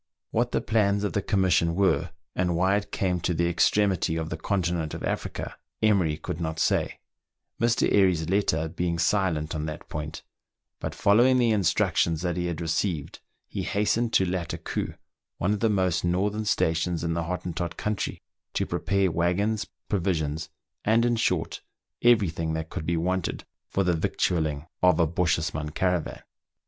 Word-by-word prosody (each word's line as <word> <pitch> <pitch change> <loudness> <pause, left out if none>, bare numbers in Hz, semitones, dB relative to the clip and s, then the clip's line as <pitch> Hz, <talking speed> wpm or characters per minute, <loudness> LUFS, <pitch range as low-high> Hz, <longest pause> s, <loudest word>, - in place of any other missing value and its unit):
What - - +1
the - - +1
plans 100 -2 +2
of 105 - -1
the 100 - +1
commission 95 -4 +2
were, 95 0 +2 0.3
and 90 -1 +1
why 95 +3 +3
it 100 0 -2
came 90 -2 0
to 90 - 0
the 85 +1 +1
extremity 95 -1 +2
of 80 0 -3
the - - -1
continent 85 -2 -1
of - - -7
Africa, - - -3 0.3
Emery 95 -8 +3
could 80 - -5
not 80 -1 -2
say, - - +1 0.6
Mr. 115 0 +3
Airy's 90 -5 +3
letter 85 -4 +1
being 85 +1 -2
silent 85 -3 +1
on 80 -1 -3
that 75 - -7
point; 75 +1 -5 0.6
but - - -4
following 120 +6 +5
the 120 -2 +3
instructions 85 -4 +2
that 85 -2 0
he 90 0 -1
had 85 -1 -3
received, 80 -1 -1 0.3
he - - -4
hastened 110 +3 +1
to 95 - +4
Lattakoo, 90 -2 -3 0.4
one 100 +4 +1
of 105 - -2
the 115 - +2
most 95 -4 +1
northern 100 +5 0
stations 85 -3 +1
in 85 0 0
the 85 0 -1
Hottentot 85 -1 -3
country, 105 -1 -3 0.3
to - - +1
prepare 90 +2 +1
waggons, 90 +6 0 0.2
provisions, 80 -5 -1 0.3
and, 115 +2 +3
in 120 -1 +2
short, 115 - 0 0.4
every 115 -6 +5
thing 80 0 -3
that 80 0 -4
could 80 - -5
be 85 0 +1
wanted 90 +1 -1 0.3
for 100 - +1
the 90 -1 +2
vic 80 - -2
tualling 80 -4 0 0.2
of 90 -3 +4
a 85 - +5
Bochjesman 80 -2 -1
caravan. 90 -3 -1
90 Hz, 165 wpm, -26 LUFS, 80-100 Hz, 0.6 s, following